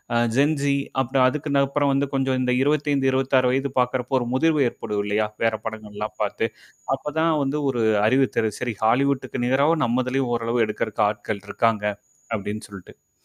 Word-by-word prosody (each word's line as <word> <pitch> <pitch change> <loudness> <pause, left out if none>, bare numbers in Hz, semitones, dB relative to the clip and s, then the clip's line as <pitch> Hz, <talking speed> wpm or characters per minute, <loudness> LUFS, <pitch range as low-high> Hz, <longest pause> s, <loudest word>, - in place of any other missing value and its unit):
அ - - +4 0.2
Gen Z 140 0 +2 0.3
அப்பறம் 130 0 +2
அதுக்கு 150 +1 -4
நப்புறம் 140 +1 +2
வந்து 140 +1 +1
கொஞ்சம் 135 -1 +1
இந்த 125 0 +1
25, 145 -1 +1
26 130 -1 +2
வயது 135 +1 -1
பாக்கறப்போ 125 +1 0
ஒரு 120 - -3
முதிர்வு 155 +3 +2
ஏற்படும் 105 -3 -4
இல்லயா? 105 +1 0 0.2
வேற 115 -1 +3
படங்கள்லாம் 105 -1 -6
பாத்து. 110 +2 -1 0.5
அப்ப 150 +2 -7
தான் 165 +1 +3
வந்து 140 +2 -1
ஒரு 120 -3 0 0.2
அறிவுத்தரு 115 -3 +2
சேரி 120 -3 -3
ஹாலிவுட்டுக்கு 130 +2 +1
நிகராவ 140 +6 +3
நம்மதலயும் 130 +1 0
ஓரளவு 115 0 0
எடுக்கறக்கு 105 0 -2
ஆட்கள் 105 -1 -5
இருக்காங்க. 115 -3 0 0.5
அப்டின்னு 105 +1 -5
சொல்ட்டு. 100 -3 -14
130 Hz, 155 wpm, -23 LUFS, 110-140 Hz, 0.5 s, அ